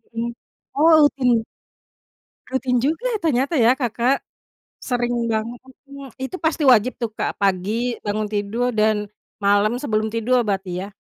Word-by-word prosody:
Mmm. 235 +1 -2 0.4
Oh 300 +3 +3
rutin? 250 -6 +3 1.1
Rutin 260 -1 0
juga 320 - -1 0.2
ternyata 280 0 +1
ya 240 +3 +5
Kakak. 245 +1 0 0.6
Sering 245 -1 -1 0.2
banget, 230 +2 -3 0.3
mhm, 280 -2 -10
itu 265 +8 -4
pasti 320 0 0
wajib 240 +2 +3
tuh, 235 - -1
Kak, - - -4
pagi 210 +5 0
bangun 210 0 -2
tidur 215 +4 -1
dan 215 -1 +1 0.3
malam 205 +4 +2
sebelum 215 -4 -1
tidur 240 +2 +1
berarti 190 -2 -3
ya? - - -8
235 Hz, 135 wpm, -21 LUFS, 215-255 Hz, 1.1 s, ya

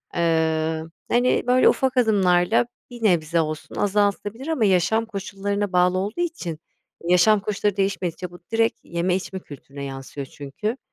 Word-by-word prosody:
Iıı, 160 -1 0 0.2
hani, 245 +1 +3
böyle, 255 +1 +5
ufak 260 -1 0
adımlarla 200 -2 +3 0.2
bir 240 -2 -10
nebze 170 -4 +3
olsun 155 -1 -5
azaltılabilir 205 +5 0
ama 295 -9 +1
yaşam 195 +4 +2
koşullarına 200 -1 -3
bağlı 180 +1 +3
olduğu 205 - -2
için 180 - -3 0.4
yaşam 180 +5 +4
koşulları 205 0 -1
değişmedikçe 185 -3 -2
bu 175 - -12
direkt 225 0 +1
yeme 175 +1 -1
içme 190 0 -4
kültürüne 140 -3 -10
yansıyor 135 +1 -6
çünkü. 205 - -5
190 Hz, 135 wpm, -23 LUFS, 170-215 Hz, 0.4 s, böyle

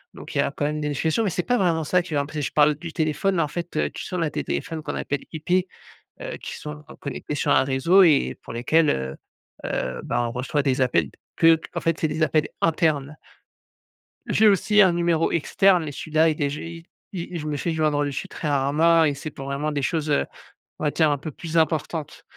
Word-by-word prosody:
donc - - -10
il - - -1
y - - +6
a, - - 0
quand 145 - -3
même, 150 +1 -2
des 150 - -1
notifications 160 +9 0
mais 210 - +1
c'est 180 0 -2
pas 245 - +1
vraiment 165 -4 +1
ça 180 +4 +2
qui 170 -4 -5
va 140 - +2
m'emp 145 - -10
je 145 - -2
parle 150 0 +4
du 165 +2 -8
téléphone 175 +4 0
là, 165 - +2
en - - -1
fait, 170 +4 -6
heu, - - +1
tu - - -7
sais, 180 - -5
on 175 - -1
a 160 - 0
des - - -3
téléphones 160 -1 -3
qu'on - - -5
appelle 140 -1 -3
IP, 175 +4 0 0.5
heu, - - -5
qui - - -7
sont 150 0 -8 0.2
connectés 140 +1 -5
sur - - -1
un 130 - +5
réseau 140 +9 +4
et 150 -5 +3
pour - - -8
lesquels, 150 +7 +2
heu 65 0 -3 0.5
heu, 65 0 -2
bah, 120 - -1
on - - -4
reçoit 130 +5 -1
des 135 -2 +1
appels 85 - +2 0.3
que 165 0 +6 0.2
qu'en - - -4
fait, 165 -1 0
c'est 160 - +1
des 155 +1 -1
appels 155 -1 +2
internes. 155 -3 +1 1.1
J'ai 220 - +5
aussi 210 +1 +4
un 190 -3 +6
numéro 170 -1 +1
externe 180 +1 +3
et 145 - -5
celui-là 155 +3 +1
il 155 -1 -1
est 140 - +1
gé 145 - -6
i 170 0 -10 0.5
i 175 - -3
je 155 - -6
me 150 -1 -2
fais 170 - -2
joindre 155 -2 +1
dessus 140 -2 -3
très 155 - -5
rarement 150 +4 +3
et 145 -2 +2
c'est 155 +2 -6
pour 135 0 -9
vraiment 140 +2 -2
des 145 -2 -2
choses, 155 +2 -1
heu, 145 - +2 0.5
on - - -5
va 150 - +1
dire, 155 -1 +3
un 145 - +1
peu 150 +2 -7
plus 165 +3 -5
importantes 160 -1 -1
155 Hz, 240 wpm, -24 LUFS, 145-165 Hz, 1.1 s, y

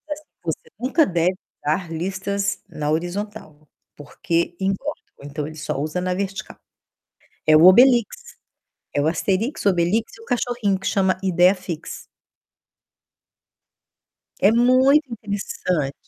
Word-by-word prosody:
diz - - -12
assim: - - -23 0.2
"Você 160 -2 -2 0.2
nunca 275 +6 +2
deve 175 +1 +1 0.3
usar 165 +3 -1
listas 195 +4 -2
na 150 -1 -3
horizontal, 175 -2 -4 0.3
porque 165 +4 -2
engorda". 195 +10 -1 0.3
Então 145 +1 -5
ele 155 - -9
só 145 - -3
usa 155 +5 -2
na 180 0 -1
vertical. 195 0 -5 0.9
É 155 0 +6
o 160 +3 +7
Obelix. 245 - +5 0.6
É 145 - +1
o 150 - +1
Asterix, 195 - -1
o - - +6
Obelix 185 +5 +1
e - - -15
o - - -14
cachorrinho, 240 - -1
que 195 - -4
chama 190 -2 +1
Ideiafix. 180 -2 +1 2.4
É 200 - +6
muito 255 +3 +4
interessante. 190 -9 -3
190 Hz, 125 wpm, -22 LUFS, 165-220 Hz, 2.4 s, o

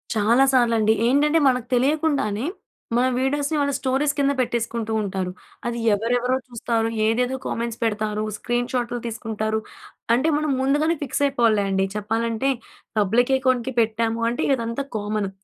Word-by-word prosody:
చాలా 225 +5 +4
సార్లండి. 230 -4 +3
ఏంటంటే 295 +5 +3
మనకు 250 -2 +1
తెలియకుండానే, 275 -4 +1 0.5
మన 250 - +3
వీడియోస్‌ని 285 +3 0
వాళ్ళ 280 -1 +1
స్టోరీస్ 275 +2 +1
కింద 280 -1 +2
పెట్టేసుకుంటూ 235 -2 -1
ఉంటారు. 190 -2 -3 0.4
అది 235 0 -2 0.2
ఎవరెవరో 245 +4 +1
చూస్తారు. 230 -2 -1 0.2
ఏదేదో 245 +4 +1
కామెంట్స్ 235 0 -3
పెడతారు. 215 -1 -1
స్క్రీన్‌షాట్‌లు 245 +1 -2
తీసుకుంటారు. 220 -1 -2 0.6
అంటే, 260 +6 +1
మనం 305 -1 0
ముందుగానే 295 +5 +2
ఫిక్స్ 285 +1 -1
అయిపోవాలిలే 230 -6 +2
అండి. 195 0 +1
చెప్పాలంటే, 225 +4 -1 0.5
పబ్లిక్ 230 +6 +2
అకౌంట్‌కి 260 -1 0
పెట్టాము 225 0 0
అంటే 240 - -2
ఇదంతా 230 +2 -3
కామన్. 210 -1 -2
235 Hz, 130 wpm, -23 LUFS, 220-265 Hz, 0.6 s, చాలా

